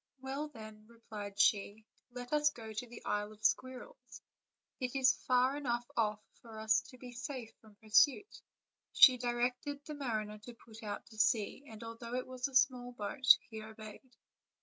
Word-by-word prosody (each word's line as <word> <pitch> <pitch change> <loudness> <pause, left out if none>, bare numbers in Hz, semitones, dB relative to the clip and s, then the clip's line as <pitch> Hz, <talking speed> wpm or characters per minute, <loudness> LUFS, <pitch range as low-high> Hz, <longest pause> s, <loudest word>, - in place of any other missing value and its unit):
"Well, 270 +3 -4
then," 215 -5 -12
replied 215 -3 -9
she, 205 +1 +2 0.2
"let 245 +2 -7
us 300 0 +4
go 225 -6 -9
to 215 +4 -4
the 235 0 -12
Isle 210 +1 -2
of 215 +1 -11
Squirrels; 260 - -2 0.6
it 255 -1 -3
is 265 -1 +3
far 255 +2 +3
enough 240 -4 -2
off 210 -2 0 0.2
for 225 -2 -11
us 220 0 +3
to 255 - -13
be 250 0 -10
safe 245 -1 -6
from 215 -2 -18
pur 220 +1 -19
suit." 290 - +4 0.5
She 255 -4 +8
directed 250 +4 -2
the 300 - -6
mariner 215 -7 -3
to 235 +3 -11
put 225 0 -14
out 205 -2 -5
to 220 - -11
sea, 215 +5 +1
and 220 0 -10
although 230 +1 -6
it 255 - -2
was 255 0 -3
a 270 - -11
small 250 -2 +3
boat, 245 +4 -5 0.2
he 220 -1 -6
obeyed. 220 +3 -11
240 Hz, 175 wpm, -34 LUFS, 215-255 Hz, 0.6 s, She